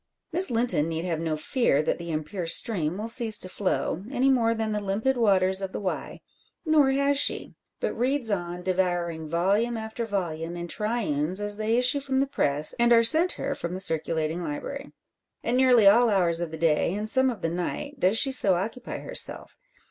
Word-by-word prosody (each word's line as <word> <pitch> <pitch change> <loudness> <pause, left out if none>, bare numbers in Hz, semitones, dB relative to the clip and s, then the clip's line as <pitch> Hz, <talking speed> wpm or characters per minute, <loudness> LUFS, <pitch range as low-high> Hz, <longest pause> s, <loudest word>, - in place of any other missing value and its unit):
Miss 365 +3 +5
Linton 230 -10 +2
need 165 +1 -4
have 165 -3 -2
no 160 -1 -2
fear 155 - +1
that - - -2
the 170 0 -7
impure 160 +3 -4
stream 170 -2 +1
will 215 +2 -5
cease 230 -2 +1
to 185 - -6
flow, 185 -2 -2
any 270 0 +1
more 230 -3 +1
than 220 -1 -3
the 210 - -1
limpid 205 +7 -1
waters 190 -4 +2
of 190 -1 -5
the - - -4
Wye. 190 -3 -5 0.4
Nor 305 -4 +3
has 280 +1 +1
she; - - +1 0.3
but - - -2
reads 255 -1 +1
on, 175 -2 -4
devouring 175 -3 -2
volume 200 +9 0
after 220 +1 -5
volume, 175 -5 -4
in 170 0 -6
triunes 190 -6 -1
as 205 0 -3
they 220 +2 0
issue 250 +3 +3
from 270 -1 -3
the 270 - +2
press, 150 - -1
and 235 0 +3
are 230 -1 +6
sent 320 +10 +4
her - - -4
from 170 +1 -5
the - - -5
Circulating 160 -1 0
Library. 275 - -6 0.5
At 235 - -1
nearly 250 -4 +4
all 230 +4 +5
hours 175 -5 +1
of 175 -1 -3
the 160 - -8
day, 165 +2 +1
and 210 +1 -4
some 260 +3 +2
of 235 - -6
the 165 - -1
night, 260 - -5
does 190 +2 +2
she 270 - +2
so 200 -8 +4
occupy 225 +7 -5
herself. - - 0
205 Hz, 200 wpm, -25 LUFS, 170-240 Hz, 0.5 s, are